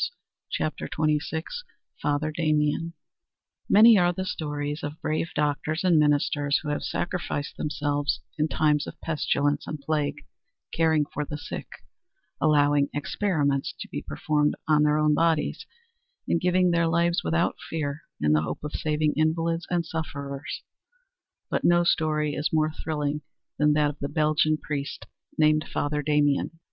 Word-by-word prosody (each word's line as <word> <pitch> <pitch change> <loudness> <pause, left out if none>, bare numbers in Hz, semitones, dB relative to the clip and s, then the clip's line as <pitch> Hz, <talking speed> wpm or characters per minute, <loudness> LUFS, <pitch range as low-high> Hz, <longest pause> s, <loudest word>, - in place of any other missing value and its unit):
CHAPTER 155 - -2
XXVI 155 +1 0 0.6
FATHER 145 +1 0
DAMIEN 155 0 0 0.8
Many 220 0 +8
are 175 0 +4
the 185 +2 -4
stories 150 -2 -3
of 145 0 -6
brave 155 +1 -1
doctors 150 +2 0
and 175 -4 +4
ministers 145 -1 +2
who 150 - -4
have 145 - -1
sacrificed 175 -5 -3
themselves 145 -1 -1 0.2
in 155 -1 +1
times 150 -1 +1
of - - -9
pestilence 145 -2 0
and 155 - -4
plague, 150 0 -2 0.5
caring 160 -2 +3
for 150 0 -4
the 150 0 -5
sick, - - -6 0.7
allowing 145 -2 +3
experiments 145 -3 0
to - - -6
be - - -4
performed 150 - 0
on 155 -1 +4
their 150 0 +3
own 150 0 +3
bodies, 165 0 +1 0.6
and 170 - +1
giving 180 0 +3
their 170 -1 +2
lives 170 +3 +2
without 170 +1 +1
fear 150 -2 -3 0.2
in 75 0 +3
the 75 - +4
hope 75 - -4
of 150 - -4
saving 150 0 0
invalids 165 +2 0
and 175 -2 0
sufferers; 140 -3 -5 0.8
but - - -1
no 175 0 +5
story 155 -3 +1
is 145 - -1
more 155 0 +2
thrilling 150 -2 -2 0.4
than 150 0 +4
that 150 -1 +2
of 145 - -16
the 140 - -3
Belgian 155 0 +2
priest 145 -2 -5 0.3
named 155 0 +4
Father 145 0 -1
Damien. 145 +1 +1
150 Hz, 145 wpm, -26 LUFS, 145-160 Hz, 0.8 s, Many